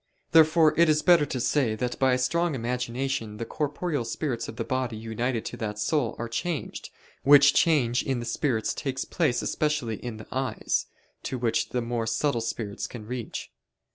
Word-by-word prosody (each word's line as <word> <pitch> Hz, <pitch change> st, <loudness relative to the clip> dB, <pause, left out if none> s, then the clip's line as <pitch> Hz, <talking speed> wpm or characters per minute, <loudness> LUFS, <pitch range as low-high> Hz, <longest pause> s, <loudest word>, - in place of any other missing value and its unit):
Therefore 160 Hz, -1 st, +6 dB
it 170 Hz, -1 st, +6 dB
is 155 Hz, 0 st, +3 dB
better 170 Hz, -5 st, +5 dB
to 130 Hz, -, -3 dB
say, 120 Hz, -3 st, +1 dB
that 125 Hz, +2 st, -3 dB
by 130 Hz, -1 st, +4 dB
a -, -, +3 dB
strong 170 Hz, +5 st, +1 dB
imagination 125 Hz, -1 st, -2 dB
the 115 Hz, -, -4 dB
(corporeal) 150 Hz, +2 st, -2 dB
spirits 120 Hz, +1 st, -3 dB
of -, -, -7 dB
the -, -, -3 dB
body 130 Hz, -4 st, -2 dB
united 115 Hz, +2 st, -2 dB
to -, -, -5 dB
that 105 Hz, -2 st, -4 dB
soul 120 Hz, +3 st, 0 dB
are 120 Hz, -, -4 dB
changed, 155 Hz, +6 st, -4 dB, 0.3 s
which 145 Hz, 0 st, +7 dB
change 125 Hz, -7 st, +3 dB
in 135 Hz, -2 st, -1 dB
the 120 Hz, -, -5 dB
spirits 120 Hz, -3 st, 0 dB
takes 135 Hz, -2 st, -3 dB
place 150 Hz, -9 st, 0 dB
especially 150 Hz, -8 st, -1 dB
in 120 Hz, -3 st, -6 dB
the 110 Hz, -, -10 dB
eyes, 130 Hz, 0 st, -1 dB, 0.3 s
to 130 Hz, -, -4 dB
which 120 Hz, -2 st, 0 dB
the 125 Hz, -1 st, -1 dB
more 115 Hz, -1 st, -2 dB
subtle 115 Hz, +2 st, 0 dB
spirits 110 Hz, -3 st, -4 dB
can 115 Hz, -4 st, -9 dB
reach. 120 Hz, 0 st, -5 dB
125 Hz, 180 wpm, -27 LUFS, 115-145 Hz, 0.3 s, which